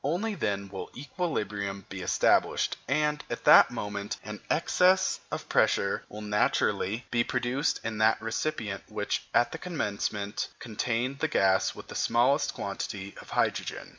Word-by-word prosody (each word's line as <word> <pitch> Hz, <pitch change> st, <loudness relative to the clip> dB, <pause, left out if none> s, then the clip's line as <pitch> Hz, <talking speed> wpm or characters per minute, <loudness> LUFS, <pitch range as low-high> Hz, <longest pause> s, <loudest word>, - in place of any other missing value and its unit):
Only 180 Hz, +10 st, 0 dB
then 100 Hz, -, -2 dB
will 95 Hz, -2 st, -6 dB
equilibrium 105 Hz, -, -3 dB
be 95 Hz, -1 st, -7 dB
established; -, -, +2 dB
and, 150 Hz, +2 st, +1 dB
at 120 Hz, -, -4 dB
that -, -, +8 dB
moment, 105 Hz, -3 st, -4 dB
an 105 Hz, 0 st, -7 dB
excess 185 Hz, +3 st, +3 dB
of -, -, -5 dB
pressure -, -, +2 dB
will 105 Hz, +1 st, -8 dB
naturally 105 Hz, +1 st, +1 dB
be 120 Hz, -1 st, +3 dB
produced 125 Hz, +5 st, 0 dB
in 110 Hz, -1 st, -3 dB
that 110 Hz, 0 st, +4 dB
recipient 115 Hz, -2 st, -3 dB
which, 105 Hz, -1 st, -2 dB
at 120 Hz, -, +3 dB
the 160 Hz, -, -6 dB
commencement, 105 Hz, -, -2 dB
contained 120 Hz, +4 st, -2 dB
the 160 Hz, -, +1 dB
gas 95 Hz, -10 st, +2 dB
with -, -, -10 dB
the -, -, -9 dB
smallest 130 Hz, +5 st, +2 dB
quantity 100 Hz, 0 st, -5 dB
of -, -, -15 dB
hydrogen. -, -, -1 dB
115 Hz, 145 wpm, -28 LUFS, 100-140 Hz, -, that